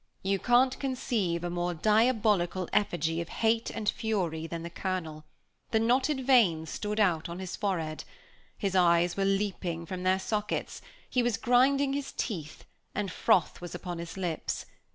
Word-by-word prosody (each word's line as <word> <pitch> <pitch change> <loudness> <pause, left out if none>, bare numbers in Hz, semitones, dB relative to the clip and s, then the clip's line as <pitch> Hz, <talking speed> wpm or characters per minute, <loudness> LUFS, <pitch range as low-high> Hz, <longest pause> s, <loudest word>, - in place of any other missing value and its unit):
You 195 0 +1
can't 255 +3 +3
conceive 225 -10 -1
a 175 - -2
more 175 0 -1
diabolical 210 -3 +2
effigy 165 -5 +1
of 170 - -7
hate 225 0 +1
and 215 - -5
fury 180 -9 -1
than 165 0 -5
the 170 - -6
Colonel; 165 -5 -4 0.4
the 220 - +2
knotted 260 +4 +1
veins 180 - +4
stood 210 0 -3
out 170 -6 +2
on 170 - -5
his 185 -1 -5
forehead, 165 -6 -2 0.5
his 195 -2 -2
eyes 175 -1 +4
were 195 - 0
leaping 195 -4 -1
from 180 +2 -5
their 185 +1 +3
sockets, 210 +2 -3 0.3
he 250 - +1
was 240 -3 +1
grinding 270 +3 +3
his 280 0 -3
teeth, 160 - -5 0.3
and 200 -3 -2
froth 175 0 +2
was 175 - -7
on 175 -2 -5
his 170 +2 -7
lips. 175 -4 -3
190 Hz, 160 wpm, -29 LUFS, 170-225 Hz, 0.5 s, veins